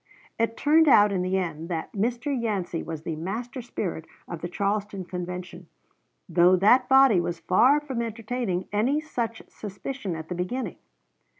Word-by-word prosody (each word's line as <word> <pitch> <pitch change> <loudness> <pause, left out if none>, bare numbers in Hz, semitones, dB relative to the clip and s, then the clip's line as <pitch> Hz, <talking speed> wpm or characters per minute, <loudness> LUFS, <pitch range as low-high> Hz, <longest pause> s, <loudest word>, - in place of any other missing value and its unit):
It 230 0 0
turned 315 +2 +4
out 210 -6 +6
in 190 -2 0
the 185 +1 0
end 165 -2 -3
that 165 -2 -3
Mr. 240 +7 -1
Yancey 205 -8 -2
was 160 -2 -6
the 165 -1 -3
master 225 - -5
spirit 180 -8 -5 0.2
of 170 -2 -7
the 175 - -4
Charleston 200 0 -2
Convention, 180 0 -6 0.6
though 175 +1 +5
that 230 +7 +4
body 265 -8 +6
was 170 -1 -3
far 255 - +4
from 265 -5 -4
entertaining 225 -4 -3
any 245 +8 +2
such 235 -7 -4
suspicion 205 -1 -6
at 160 0 -7
the - - -4
beginning. 180 +9 -3
200 Hz, 160 wpm, -26 LUFS, 180-245 Hz, 0.6 s, out